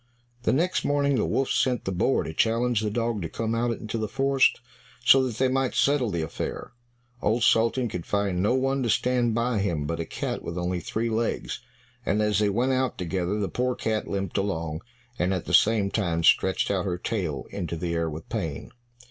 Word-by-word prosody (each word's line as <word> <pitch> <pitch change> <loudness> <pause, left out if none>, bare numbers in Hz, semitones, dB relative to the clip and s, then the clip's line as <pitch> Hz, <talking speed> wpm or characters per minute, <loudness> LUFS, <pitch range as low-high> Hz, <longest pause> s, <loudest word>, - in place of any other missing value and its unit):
The - - +1
next 175 +7 +1
morning 140 -1 +2
the - - +1
wolf 135 - 0
sent 125 -2 +1
the 95 - -1
boar 90 - +1
to 80 - -6
challenge 115 +3 +2
the 110 - 0
dog 115 -1 -1
to 80 - -4
come 115 +4 -2
out 120 +1 +1
into 110 +1 -4
the 110 - -1
forest 135 +4 +2 0.5
so 135 0 +7
that 120 - -5
they 130 - +3
might 130 0 0
settle 140 -4 +2
the 85 -4 -1
affair. 80 - -5 0.5
Old 110 +2 +1
Sultan 115 +2 +3
could 90 -6 -6
find 100 -3 0
no 105 +6 +2
one 135 +1 +1
to 120 - 0
stand 120 -1 +2
by 120 -1 +1
him 85 -7 -1
but 85 +2 -3
a 85 - -2
cat - - -4
with 85 - -6
only 90 0 -1
three 115 +7 -2
legs, 115 +1 -1 0.4
and 105 - 0
as 105 -1 +2
they 105 -1 +3
went 120 +6 +1
out 130 -2 0
together 90 +3 -2
the 100 - 0
poor 125 +3 -1
cat 110 -1 -2
limped 100 -1 -2
along, 80 -5 -2 0.4
and 90 +2 +1
at 90 - -4
the - - -4
same 105 -3 +4
time 85 -6 0
stretched 95 +4 +3
out 95 -3 0
her 90 -2 -1
tail 90 - -3
into 85 -4 -4
the 85 +1 -3
air 85 -1 0
with 80 +1 -8
pain. - - -4
105 Hz, 210 wpm, -26 LUFS, 90-125 Hz, 0.5 s, so